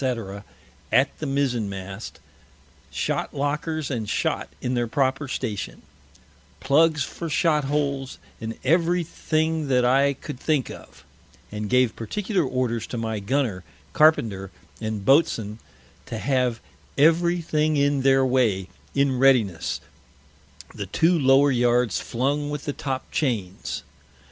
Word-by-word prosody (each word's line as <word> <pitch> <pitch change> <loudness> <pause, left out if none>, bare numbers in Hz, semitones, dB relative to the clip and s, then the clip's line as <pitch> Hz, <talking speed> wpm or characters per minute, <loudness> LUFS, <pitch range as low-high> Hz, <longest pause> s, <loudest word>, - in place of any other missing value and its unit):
_ 115 -7 -3 0.5
at - - +3
the - - -3
Mizen 130 -6 0
mast, 95 +1 -7 0.7
Shot - - -2
lockers 150 +1 -2
and 110 -5 -3
Shot - - -1
in 125 - -2
their 120 -1 0
proper 135 +2 0
Station; 115 -6 -4 0.8
Pluggs 150 +1 +3
for 165 +5 -6
Shot 150 -2 +2
holes; 140 -2 -1 0.2
and 115 0 -5
every 170 +4 +2
thing 160 -1 -1
that 125 -2 +3
I 135 +3 +4
could 125 - -8
think 150 -4 0
of: - - -13 0.5
and 105 0 -4
gave 125 -2 +3
particular 190 - -1
Orders 125 -4 -1
to 120 - -5
my 110 -2 -2
Gunner, 110 -3 -1 0.3
Carpenter, 110 -11 +3 0.3
and 110 -3 -3
Boatswain, 120 -7 +2 0.5
to 115 - -4
have 125 -2 0 0.4
every 170 +4 +4
thing 155 -2 +1
in 140 -1 +2
their 135 0 +4
way, 115 -8 +1 0.3
in 140 -2 +2
Readiness, 120 -11 +2 0.9
the - - -5
two 165 +3 +3
lower 135 +1 +5
Yards 120 -3 +2
flung 140 +4 -1
with 145 -1 -5
the 145 - -2
Top 135 -2 -4
chains. 105 - -2
135 Hz, 130 wpm, -24 LUFS, 115-150 Hz, 0.9 s, lower